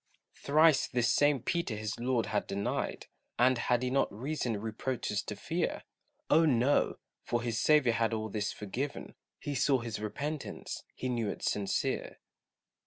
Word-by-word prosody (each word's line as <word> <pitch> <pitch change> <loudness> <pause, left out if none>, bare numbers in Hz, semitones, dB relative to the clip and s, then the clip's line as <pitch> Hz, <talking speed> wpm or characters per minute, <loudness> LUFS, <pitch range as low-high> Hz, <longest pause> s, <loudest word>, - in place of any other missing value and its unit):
Thrice 155 0 +4
this 120 -1 +2
same 145 -4 +3
Peter 170 -10 -1
his 105 +1 -4
Lord 120 -1 +1
had 105 - -1
denied, 100 +1 -2 0.3
And 125 0 +4
had 120 0 +1
he 125 - 0
not 135 - +2
reason 120 -1 -2
reproaches 110 0 -2
to - - -6
fear? - - -2 0.4
Oh, 160 +2 +5
no! 140 -2 +3 0.2
for 120 -1 -1
his 115 -2 -1
Saviour 150 -6 +4
had 115 0 +1
all 110 -1 -2
this 105 0 -2
forgiven, 125 +8 -5 0.2
He 145 - -4
saw 135 +1 +3
his 115 -3 -4
repentance, 140 +8 -4
he 130 - -3
knew 120 -4 -1
it - - -6
sincere. 100 -2 -1
120 Hz, 155 wpm, -31 LUFS, 110-140 Hz, 0.4 s, Oh